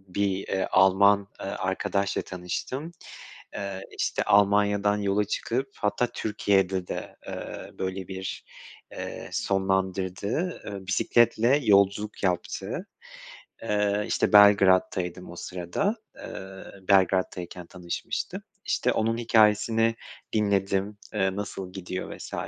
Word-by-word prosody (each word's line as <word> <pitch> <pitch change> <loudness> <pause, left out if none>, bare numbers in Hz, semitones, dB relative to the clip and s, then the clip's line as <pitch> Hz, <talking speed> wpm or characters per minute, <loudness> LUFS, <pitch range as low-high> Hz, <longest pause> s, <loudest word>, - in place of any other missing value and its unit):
bir, 100 -1 0
eee, 95 -1 0
Alman, 100 +1 +5
eee, - - -6
arkadaşla 95 0 -1
tanıştım. 95 - -5 0.6
Eee, 100 -1 -4 0.2
işte - - 0
Almanya'dan 105 0 +3
yola 100 0 +1
çıkıp 125 +6 -2
hatta 105 +4 0
Türkiye'de 95 -4 0
de, - - -6
eee, - - -7
böyle 95 -1 -4
bir, 95 -1 -5 0.5
eee, - - -6
sonlandırdı. 95 - -1
Eee, 100 -2 -7
bisikletle 120 +6 +3
yolculuk 100 0 +3
yaptı. 95 - -2 0.8
Eee, 105 -1 +1
işte - - 0
Belgrad'taydım 95 -3 +5
o - - -9
sırada. 90 - -2 0.2
Eee, 95 0 -9 0.2
Belgrad'tayken 95 -2 +1
tanışmıştım. 90 -1 -4 0.2
İşte - - +1
onun 115 +1 0
hikâyesini 115 0 +3 0.4
dinledim, 100 -1 +1 0.2
eee, 95 0 +1
nasıl 95 -2 -5
gidiyor 90 -1 -5
vs. - - -9
100 Hz, 105 wpm, -27 LUFS, 95-105 Hz, 0.8 s, Alman